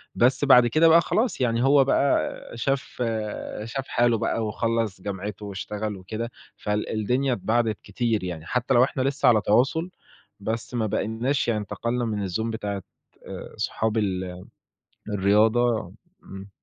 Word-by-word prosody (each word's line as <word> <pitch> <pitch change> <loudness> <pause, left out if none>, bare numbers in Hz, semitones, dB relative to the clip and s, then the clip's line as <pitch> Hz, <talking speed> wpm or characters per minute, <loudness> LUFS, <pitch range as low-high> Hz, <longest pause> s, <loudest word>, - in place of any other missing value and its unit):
بس 130 +3 +3
بعد 125 -3 +7
كده 155 +7 +4
بقى 165 +1 +7
خلاص 220 - 0
يعني 120 0 +1
هو 140 0 +6
بقى 140 +1 +2 0.2
شاف 130 0 -2 0.6
شاف 130 +4 -5
حاله 120 -1 +2
بقى، 110 +1 -1
وخلّص 115 -3 -1
جامعته، 100 +1 -5
واشتغل 105 +1 -4
وكده، 110 +6 -5 0.3
فال 105 0 -2
الدنيا 125 +5 0
اتباعدت 110 +1 0
كتير 110 0 -1
يعني، 85 -3 -5
حتى 125 +4 0
لو 120 +1 +6
إحنا 130 - -1
لسه 135 0 +1
على 110 -3 +5
تواصل، 130 - +2 0.5
بس 115 +4 -4
ما 115 -2 0
باقيناش 115 +6 -1
يعني 110 -3 +1
انتقلنا 120 +4 -2
من 105 -3 -2
الZone 90 +5 -2
بتاعة، 100 -4 -4 0.4
آآ، - - -8
صحاب 110 0 -1
ال 95 -3 -2 0.7
الرياضة 105 +1 +2 0.3
إمم. 95 +1 -10
115 Hz, 145 wpm, -25 LUFS, 105-125 Hz, 0.7 s, بعد